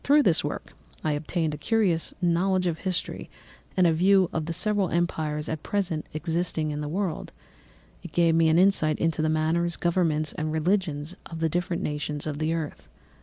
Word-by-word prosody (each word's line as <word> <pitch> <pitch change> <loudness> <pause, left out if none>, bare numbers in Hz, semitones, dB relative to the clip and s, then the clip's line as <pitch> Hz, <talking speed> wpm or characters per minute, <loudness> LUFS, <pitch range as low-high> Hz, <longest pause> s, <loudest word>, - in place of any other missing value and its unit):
Through 290 +1 +5
this 175 -6 +3
work - - -5 0.3
I 155 - +1
obtained 155 +1 -1
a 150 - -6
cursory 210 -1 +2 0.3
knowledge 180 +2 +2
of 165 -2 -1
history 185 -2 -3 0.5
and 185 - +5
a 165 - +4
view 185 +2 +4
of 160 -1 -2
the - - -2
several 205 +1 0
empires 155 -3 -1
at 160 -2 -3
present 185 -6 -2
existing 160 -1 -1
in 150 0 -3
the 150 - -3
world; 180 -1 -2 0.7
it 175 - -9
gave 170 0 +3
me 165 0 +4
an 160 - +4
insight 175 -5 +3
into 165 -1 0
the 155 - +1
manners, 165 +2 +1
governments, 165 -4 0
and 155 0 -3
religions 160 -1 0
of 165 - -7
the 165 0 +1
different 175 +1 -1
nations 150 0 -3
of 150 -1 -3
the 155 +1 0
earth. 165 -3 -4
165 Hz, 185 wpm, -26 LUFS, 155-180 Hz, 0.7 s, Through